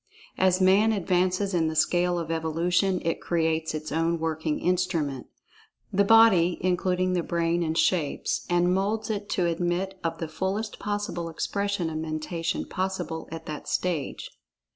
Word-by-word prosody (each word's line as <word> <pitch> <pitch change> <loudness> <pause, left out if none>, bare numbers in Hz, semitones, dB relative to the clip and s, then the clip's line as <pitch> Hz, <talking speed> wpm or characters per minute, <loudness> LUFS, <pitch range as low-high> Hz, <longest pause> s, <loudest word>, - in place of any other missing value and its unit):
As 185 0 +3
Mind 200 +4 +4
advances 185 +1 +1
in 165 -2 +2
the 160 - -3
scale 175 +2 +2
of 165 -1 -3
evolution 175 +4 +1
it 165 - -1
creates 160 -1 0
its 155 0 -5
own 165 +2 +1
working 160 -1 -2
instrument—the 180 +1 -2
body 200 -5 +5
(including 185 0 +1
the 180 - +1
brain) 170 0 0
and 160 -1 -1
shapes, 165 -6 +1
and 175 +1 +3
moulds 215 +3 -1
it 205 -1 -4
to 180 - +1
admit 175 +3 -1
of 165 0 -2
the 165 - -4
fullest 190 +7 -3
possible 205 -5 -3
expression 200 +2 -2
of 155 - -4
Men[Pg 155 0 -3
33]tation 165 +1 -3
possible 185 -4 -3
at 160 0 -7
that 150 -1 -7
stage. 170 -6 -2
175 Hz, 150 wpm, -26 LUFS, 165-190 Hz, -, body